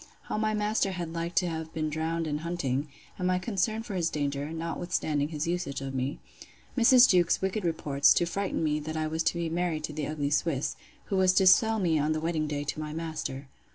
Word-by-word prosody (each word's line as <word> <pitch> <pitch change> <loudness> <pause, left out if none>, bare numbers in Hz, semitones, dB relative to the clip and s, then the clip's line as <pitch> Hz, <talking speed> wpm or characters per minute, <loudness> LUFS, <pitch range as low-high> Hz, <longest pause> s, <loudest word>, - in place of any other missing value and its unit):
How - - -4
my 215 0 +1
master 210 -2 0
had 170 -2 -5
like 170 +1 -3
to 180 - +3
have 160 -1 -4
been 155 -1 -1
drowned 160 +2 -1
in 150 -1 -2
hunting; 150 -4 -2 0.3
and 180 - 0
my 185 0 +2
concern 220 +3 -1
for 225 - -7
his 170 -3 0
danger, 145 0 -2
notwithstanding 160 -2 -2
his 155 -1 -3
usage 170 -5 -2
of 135 0 -5
me. 130 +2 -2 0.6
Mrs. 250 0 +7
Jewkes's 175 -3 +3
wicked 190 +2 -1
reports, 150 -4 +3
to 175 - +3
frighten 190 0 -2
me, 150 -1 +1
that 155 +1 -5
I 155 - 0
was 160 +1 -1
to 165 - +1
be 170 -1 -1
married 165 -2 -1
to 155 - -4
the 150 -1 -3
ugly 145 -2 -2
Swiss; 150 -2 0 0.3
who 195 - -1
was 185 -1 +4
to 190 - +4
sell 220 +4 +6
me 170 -6 +2
on 150 +2 +1
the 155 - -1
wedding 160 -1 -1
day 145 -1 -2
to 145 - -4
my 150 0 -4
master. 155 -4 -4
165 Hz, 225 wpm, -28 LUFS, 150-180 Hz, 0.6 s, Mrs